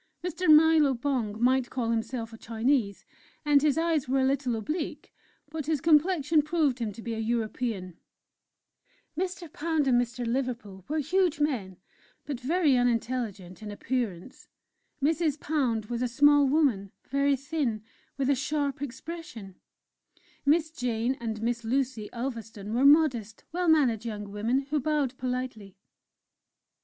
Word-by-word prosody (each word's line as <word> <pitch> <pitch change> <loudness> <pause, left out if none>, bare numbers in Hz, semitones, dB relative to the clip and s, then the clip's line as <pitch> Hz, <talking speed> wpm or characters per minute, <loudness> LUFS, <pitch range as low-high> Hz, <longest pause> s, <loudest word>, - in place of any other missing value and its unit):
Mr. 360 +1 -2
Nilo 310 -3 +6
Bong 235 -5 -2
might 255 +1 +2
call 235 -3 -2
himself 230 0 -3
a - - -9
Chinese, 225 -2 0 0.4
and 290 -1 +5
his 300 0 +2
eyes 325 -5 0
were 270 - +2
a 260 - +3
little 265 -3 0
oblique, 305 - -4 0.4
but 310 -2 -5
his 315 -2 +1
complexion 315 0 +3
proved 300 -4 0
him 225 -3 -2
to 220 +3 -11
be 230 - -3
a 220 - -4
European; 220 -5 -2 1.2
Mr. 360 -2 -4
Pound 315 -2 0
and 245 -2 +4
Mr. 240 0 -4
Liverpool 230 -6 -3
were 310 - -2
huge 335 +2 +1
men, 230 - -1 0.5
but 280 -5 -4
very 295 +1 +2
unintelligent 230 -6 -1
in 215 - -7
appearance; 225 -1 -4 0.6
Mrs. 310 -1 +1
Pound 255 -9 0
was 235 +2 -4
a 250 - +1
small 290 +3 +5
woman 260 -10 +1 0.2
very 280 +1 +2
thin, 275 -6 -2 0.3
with 270 -2 0
a 280 - +4
sharp 285 0 -2
expression; 270 - -7 0.9
Miss 315 +1 +3
Jane 245 -3 -1
and 225 -2 -4
Miss 235 0 -1
Lucy 245 -2 -1
Ulverstone 225 -4 -5
were 250 +4 +2
modest, 260 -8 +4
well 355 +2 -1
mannered 265 -9 +3
young 210 -3 -5
women, 225 +6 0
who 300 - +2
bowed 285 -2 0
politely. 250 -6 -4
255 Hz, 145 wpm, -28 LUFS, 225-300 Hz, 1.2 s, Nilo